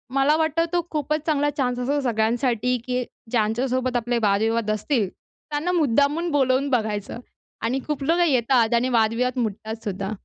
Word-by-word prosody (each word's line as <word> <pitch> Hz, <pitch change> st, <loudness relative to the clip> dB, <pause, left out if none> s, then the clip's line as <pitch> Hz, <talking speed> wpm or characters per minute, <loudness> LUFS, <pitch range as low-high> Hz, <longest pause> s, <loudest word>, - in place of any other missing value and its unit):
मला 275 Hz, +2 st, +4 dB
वाटतं, 320 Hz, +1 st, +1 dB
तो 345 Hz, -2 st, +1 dB
खूपच 305 Hz, 0 st, -2 dB
चांगला 290 Hz, -2 st, +2 dB
चान्स 250 Hz, -3 st, 0 dB
असतो 280 Hz, +4 st, 0 dB
सगळ्यांसाठी, 235 Hz, +2 st, +1 dB
की 250 Hz, 0 st, 0 dB, 0.3 s
ज्यांच्या 225 Hz, +2 st, +1 dB
सोबत 255 Hz, 0 st, -1 dB
आपले 240 Hz, +1 st, -1 dB
वादविवाद 215 Hz, +2 st, +1 dB
असतील, 215 Hz, +1 st, 0 dB, 0.4 s
त्यांना 300 Hz, +4 st, -1 dB
मुद्दामून 300 Hz, +1 st, +2 dB
बोलावून 270 Hz, 0 st, +2 dB
बघायचं 215 Hz, -4 st, -1 dB, 0.4 s
आणि 245 Hz, +4 st, 0 dB
खूप 295 Hz, -2 st, -2 dB
लोकं 340 Hz, +5 st, +3 dB
येतात 245 Hz, -5 st, +2 dB
आणि 245 Hz, +2 st, +1 dB
वादविवाद 235 Hz, +2 st, +1 dB
मिटतात 220 Hz, 0 st, -4 dB
सुद्धा. 195 Hz, 0 st, -3 dB
250 Hz, 150 wpm, -23 LUFS, 225-285 Hz, 0.4 s, मला